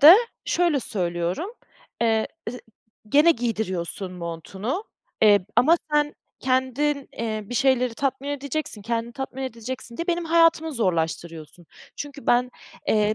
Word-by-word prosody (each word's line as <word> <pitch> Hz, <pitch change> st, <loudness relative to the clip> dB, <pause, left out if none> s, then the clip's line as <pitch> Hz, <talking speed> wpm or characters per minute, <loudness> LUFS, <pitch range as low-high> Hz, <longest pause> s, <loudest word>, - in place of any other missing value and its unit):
de 315 Hz, +6 st, +11 dB, 0.3 s
şöyle 340 Hz, -5 st, +2 dB
söylüyorum, 180 Hz, -, -2 dB, 0.5 s
eee, 225 Hz, -1 st, +2 dB, 0.2 s
zı 250 Hz, -1 st, -8 dB, 0.5 s
gene 295 Hz, +8 st, +6 dB
giydiriyorsun 200 Hz, -, -2 dB
montunu, 190 Hz, -, -4 dB, 0.4 s
eee, 205 Hz, -3 st, +6 dB
ama 320 Hz, +7 st, +6 dB, 0.2 s
sen 295 Hz, 0 st, +2 dB, 0.3 s
kendin, 260 Hz, +2 st, +1 dB
eee, 220 Hz, -2 st, -2 dB
bir 245 Hz, -, -6 dB
şeyleri 255 Hz, -2 st, +3 dB
tatmin 275 Hz, +2 st, -2 dB
edeceksin, 285 Hz, -5 st, -3 dB
kendini 230 Hz, +2 st, -2 dB
tatmin 265 Hz, 0 st, -5 dB
edeceksin 235 Hz, -1 st, -4 dB
diye 335 Hz, -, -3 dB
benim 345 Hz, -1 st, 0 dB
hayatımı 330 Hz, -1 st, +4 dB
zorlaştırıyorsun. 165 Hz, -, -2 dB, 0.3 s
Çünkü 285 Hz, -1 st, -7 dB
ben, 245 Hz, +1 st, +3 dB, 0.4 s
eee, 215 Hz, 0 st, +3 dB
245 Hz, 125 wpm, -24 LUFS, 210-285 Hz, 0.5 s, de